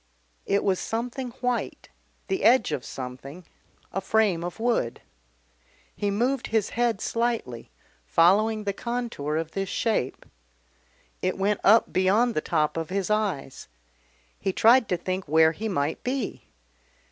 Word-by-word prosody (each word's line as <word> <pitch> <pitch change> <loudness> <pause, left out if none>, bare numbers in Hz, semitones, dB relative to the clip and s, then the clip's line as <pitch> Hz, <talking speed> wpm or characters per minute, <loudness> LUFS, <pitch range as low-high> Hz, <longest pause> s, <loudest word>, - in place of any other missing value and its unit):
It 200 - +2
was 190 -2 +1
something 245 +3 -3
white, 250 -1 -2 0.4
the 380 - -2
edge 240 -2 +5
of 125 - -2
something, 135 +6 -8 0.5
a 195 - -1
frame 205 -7 +1
of 175 +5 -6
wood. 225 - -1 0.9
He 205 - -1
moved 240 +6 0
his 220 -2 0
head 235 -3 0
slightly, 230 - -2 0.4
following 210 - +3
the 200 -1 -1
contour 235 -11 -3
of 160 0 -3
this 195 -1 -3
shape. 215 - -1 1.0
It - - -1
went 200 +1 +1
up 220 +3 +5
beyond 205 +6 +3
the 155 - 0
top 150 +1 0
of 165 -1 -3
his 195 +1 -2
eyes. 195 -11 -2 0.7
He 190 - -1
tried 230 +4 +5
to 180 - +1
think 185 +2 -3
where 160 +1 +5
he 220 +7 -4
might 150 -4 -2
be. 255 -3 -3
200 Hz, 140 wpm, -26 LUFS, 165-230 Hz, 1.0 s, edge